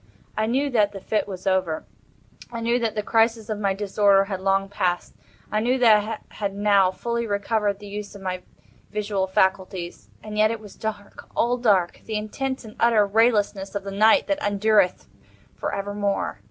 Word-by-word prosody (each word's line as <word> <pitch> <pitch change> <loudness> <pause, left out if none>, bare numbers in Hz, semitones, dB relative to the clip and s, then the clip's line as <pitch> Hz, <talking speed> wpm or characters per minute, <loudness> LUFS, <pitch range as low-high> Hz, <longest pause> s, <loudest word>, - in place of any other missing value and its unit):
I 215 0 0
knew 275 +4 0
that 210 -4 +2
the 195 - -6
fit 215 +3 -1
was 190 -1 -8
over. 185 -4 0 0.7
I 230 - -5
knew 235 +1 +1
that 230 -2 -1
the 210 - -1
crisis 225 0 +1
of 215 -1 -2
my 195 -2 0
disorder 200 0 +3
had 195 -2 -5
long 195 0 +1
passed. 180 -3 -2 0.4
I 215 - +1
knew 245 +4 +1
that 230 -4 +6 0.3
I - - -19
had 200 -2 -3
now 200 -2 +4
fully 235 +4 -3
recovered 205 0 0
the 205 - -12
use 205 0 -7
of 200 - -10
my 185 -1 -3 0.5
visual 205 -2 -1
faculties—and 190 +2 -2
yet 215 0 +5
it 230 0 -3
was 210 -2 -12
dark—all 220 +3 -3
dark—the 210 -1 +1
intense 260 +5 -4
and 215 - -11
utter 230 -3 +4
raylessness 205 -2 +1
of 200 - -2
the 195 - -6
Night 215 +3 +4
that 295 -1 -1
endureth 205 -2 +2 0.5
for - - -3
evermore. 200 0 -2
205 Hz, 175 wpm, -24 LUFS, 195-220 Hz, 0.7 s, that